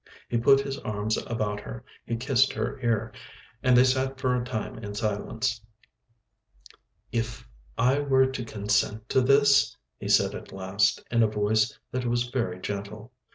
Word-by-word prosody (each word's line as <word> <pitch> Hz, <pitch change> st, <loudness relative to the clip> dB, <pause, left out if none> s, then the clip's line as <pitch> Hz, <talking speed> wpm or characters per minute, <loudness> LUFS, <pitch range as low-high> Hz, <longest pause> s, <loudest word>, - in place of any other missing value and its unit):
He 120 Hz, -, +1 dB
put 135 Hz, +3 st, +5 dB
his 135 Hz, 0 st, -5 dB
arms 105 Hz, 0 st, -2 dB
about 105 Hz, -3 st, -2 dB
her, -, -, -9 dB, 0.2 s
he 115 Hz, -, -1 dB
kissed 130 Hz, +2 st, +2 dB
her 110 Hz, -, -3 dB
ear, 115 Hz, 0 st, 0 dB, 0.5 s
and 125 Hz, -1 st, +4 dB
they 125 Hz, -, +8 dB
sat 130 Hz, +1 st, 0 dB
for 130 Hz, -1 st, +1 dB
a 125 Hz, -, -1 dB
time 110 Hz, -3 st, -4 dB
in 105 Hz, -2 st, -7 dB
silence. 110 Hz, +1 st, -2 dB, 1.5 s
"If 115 Hz, 0 st, -3 dB, 0.3 s
I 130 Hz, +4 st, +3 dB
were 135 Hz, -2 st, +3 dB
to 130 Hz, -2 st, -3 dB
consent 105 Hz, 0 st, -1 dB
to 130 Hz, -, +3 dB
this?" 140 Hz, +1 st, +4 dB, 0.2 s
he -, -, -5 dB
said -, -, +4 dB
at -, -, -9 dB
last, 95 Hz, +2 st, 0 dB
in 120 Hz, -1 st, +3 dB
a 110 Hz, -, +5 dB
voice 105 Hz, +1 st, +1 dB
that 125 Hz, 0 st, -2 dB
was 120 Hz, 0 st, +1 dB
very 105 Hz, -8 st, -2 dB
gentle. 105 Hz, +4 st, -6 dB
115 Hz, 160 wpm, -27 LUFS, 105-130 Hz, 1.5 s, they